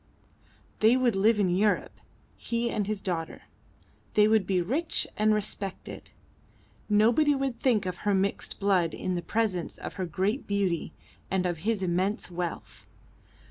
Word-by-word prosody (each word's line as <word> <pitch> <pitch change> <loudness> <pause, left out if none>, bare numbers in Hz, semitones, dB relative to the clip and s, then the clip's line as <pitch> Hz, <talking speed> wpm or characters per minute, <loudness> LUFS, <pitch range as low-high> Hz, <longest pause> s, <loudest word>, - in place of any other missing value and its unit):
They 225 +4 +5
would 245 -4 +2
live 210 +3 +3
in 200 - +3
Europe, 205 +2 0 0.3
he 235 0 -2
and 205 -2 -1
his 210 -2 -3
daughter. 170 -4 -4 0.7
They 210 0 +6
would 215 -3 +3
be 190 -2 +2
rich 270 - +1
and 215 +1 +3
respected. 205 -2 -4 0.8
Nobody 235 +8 +4
would 270 -3 -2
think 235 -7 +2
of 180 -1 -3
her 205 +1 0
mixed 195 +1 -2
blood 185 -5 +2
in 185 - -3
the 175 - -2
presence 205 -4 -1
of - - -7
her 185 - -2
great 195 - -1
beauty 195 -6 -1 0.4
and 190 -1 0
of 175 -3 -1
his 210 +2 -1
immense 185 +2 -1
wealth. 175 -1 -6
205 Hz, 150 wpm, -28 LUFS, 185-220 Hz, 0.8 s, They